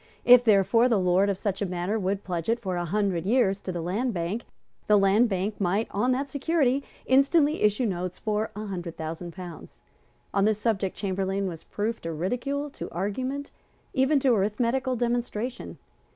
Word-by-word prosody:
If, 245 0 +8
therefore, 230 +3 +4
the 230 - +3
lord 185 +2 +3
of 195 - -1
such 195 0 -3
a - - +1
manor 180 +4 -2
would 195 +1 -1
pledge 175 0 -3
it 230 +1 +2
for 190 -5 -3
a 175 0 -2
hundred 190 -2 0
years 200 -2 +2
to 185 - -4
the 175 -2 -4
Land 215 +7 -1
Bank, 175 +7 -3 0.4
the 210 - +6
Land 200 +4 +4
Bank 200 +2 -2
might, 200 +4 +1
on 245 +6 +1
that 270 +2 0
security, 280 -2 +1 0.2
instantly 285 +3 +3
issue 210 +4 +2
notes 180 -3 -3
for 215 0 -1
a 215 +1 -5
hundred 175 -4 -6
thousand 165 +2 -5
pounds. 180 -3 -10 0.5
On 200 0 +3
this 215 -1 +2
subject 210 -4 -1
Chamberlayne 195 0 -1
was 165 -3 -7
proof 220 +2 -3
to 165 - -4
ridicule, 250 - -2
to - - -7
argument, 255 +10 -3 0.4
even 275 +2 +3
to 260 -2 +4
arithmetical 235 +5 0
demonstration. 240 0 -3
210 Hz, 180 wpm, -26 LUFS, 185-245 Hz, 0.5 s, If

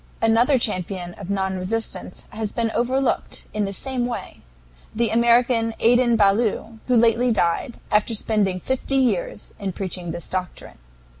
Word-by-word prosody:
Another 230 +5 +4
champion 185 -5 -1
of 195 0 -10
non 190 -1 -1
resistance 190 0 -3
has 215 -1 -4
been 230 -2 -1
overlooked 260 +4 -1
in 210 -1 0
the 195 - -3
same 250 +4 -1
way 240 - -6 0.5
the 230 -1 +1
American 235 0 +3
Adin 240 0 +4
Ballou, 215 +2 +1
who 250 -1 +3
lately 235 +2 +4
died, 205 +4 0
after 210 +2 +2
spending 205 -4 0
fifty 260 +6 -1
years - - -1
in 195 -3 -3
preaching 180 -2 -4
this 170 +1 -5
doctrine. 185 - -5
225 Hz, 145 wpm, -22 LUFS, 195-240 Hz, 0.5 s, Another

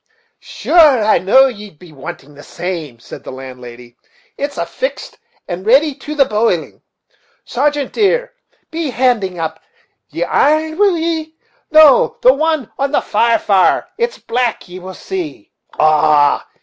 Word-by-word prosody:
"Sure 300 -9 +3
I 215 -3 +3
know'd 250 +6 +3
ye'd 205 -6 -12
be 175 +1 -15
wanting 150 +1 -10
that 145 0 -14
same," 165 -9 -6
said 115 - -12
the - - -8
landlady; 125 -2 -11 0.4
"it's 285 0 -5
fixt - - -5 0.3
and 175 +1 -5
ready 275 +8 +3
to 300 +3 -8
the 280 -2 +4
boiling. 210 -7 -1 0.6
Sargeant, 285 +2 -1
dear, - - 0 0.4
be 320 -2 -3
handing 235 -7 0
up 160 -1 -4 0.5
the - - -2
iron, 315 +3 +1
will 400 -4 +3
ye? 320 -1 -3 0.3
no, 310 -4 +5
the 255 - +7
one 310 -3 -1
on 275 0 0
the - - +1
far 230 +2 +1
fire, 195 -2 +2
it's 475 +1 -1
black, 240 -3 -2
ye 180 +1 -10
will 185 0 -9
see. 350 -2 -7 0.3
Ah! 150 -1 +3
245 Hz, 145 wpm, -16 LUFS, -, 0.6 s, the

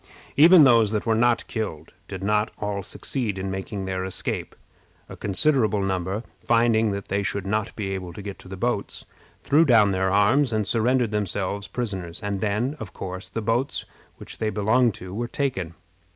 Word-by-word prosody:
Even 165 +2 +8
those 115 -5 +5
that 105 - -1
were 115 - +2
not 120 +1 +2
killed 80 -9 -5
did 95 -1 -7
not 105 +1 +1
all 105 -1 -3
succeed 105 +1 -3
in 95 0 -3
making 95 +1 -4
their 95 -1 -2
escape. 95 -1 -4 0.5
A - - -9
considerable 110 -1 +1
number, 95 +3 -2 0.2
finding 115 -1 +3
that 100 -1 -4
they 100 +1 0
should 100 0 -3
not 105 +1 -1
be 100 -3 -3
able 95 -2 -4
to 100 - -9
get 100 -1 -7
to - - -14
the 95 +1 -7
boats, 120 0 -2 0.4
threw 150 +3 +4
down 115 -9 +5
their 95 0 +1
arms, 115 +7 +3
and 110 -2 0
surrendered 120 +1 +2
themselves 100 -1 -2
prisoners; 95 -8 -4
and 100 -2 -2
then, 110 +7 0
of 105 -4 -8
course, 95 0 -6
the 110 +3 -4
boats 120 +6 0 0.3
which - - -9
they 110 - 0
belonged 110 +3 +2
to 90 0 -9
were 120 +3 -2
taken. 95 - -2
105 Hz, 180 wpm, -24 LUFS, 95-115 Hz, 0.5 s, Even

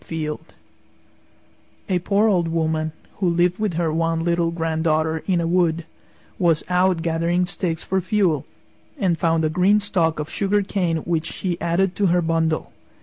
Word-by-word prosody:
Fielde 160 0 -5 1.3
A 185 -3 +1
poor 200 +5 +2
Old 180 -5 +2
Woman, 160 -1 -1 0.3
who 185 -3 +1
lived 175 +2 +1
with 210 -6 -1
her 165 -2 0
one 165 0 0
little 170 0 +1
granddaughter 160 -1 0
in 185 -3 +2
a 170 - 0
wood, 170 -1 +1 0.5
was 165 -3 +2
out 180 -2 +2
gathering 170 +2 +1
sticks 175 -3 -3
for 190 0 0
fuel 185 -6 +1 0.5
and 175 -4 0
found 165 0 +2
a - - +1
green 185 +5 +3
stalk 170 -6 0
of 150 - -3
sugar 200 +3 0
cane 180 -4 -1
which 165 -1 -1
she 175 -3 -3
added 180 +3 +1
to 200 - +2
her 175 0 +2
bundle. 160 -1 0
170 Hz, 160 wpm, -22 LUFS, 160-180 Hz, 1.3 s, green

